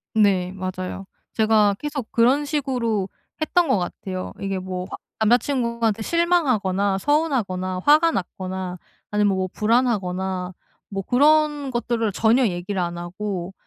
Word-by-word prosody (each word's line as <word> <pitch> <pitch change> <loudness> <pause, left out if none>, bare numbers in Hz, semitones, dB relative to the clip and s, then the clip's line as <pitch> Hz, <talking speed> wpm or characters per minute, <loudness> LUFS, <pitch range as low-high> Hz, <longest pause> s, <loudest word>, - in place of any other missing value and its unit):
네, 190 -4 +3
맞아요. 185 0 -5 0.3
제가 215 -2 +3
계속 290 -5 -5
그런 255 +5 +3
식으로 250 -9 -1 0.3
했던 340 +2 +2
것 210 - +4
같아요. 185 +1 -5
이게 195 -1 -2
뭐 185 -1 -5
화 - - -6 0.3
남자 235 +3 +6
친구한테 235 -5 -1
실망하거나, 225 - +1
서운하거나, 195 - 0
화가 310 +3 +6
났거나, 185 - -4 0.3
아니면 210 -2 +2
뭐 185 - 0
불안하거나 190 -6 0 0.4
뭐 195 -1 -4
그런 295 +2 +3
것들을 235 -3 -1
전혀 230 +5 +3
얘기를 185 +1 -3
안 175 0 -3
하고 185 +1 -5
210 Hz, 295 characters per minute, -23 LUFS, 185-255 Hz, 0.4 s, 남자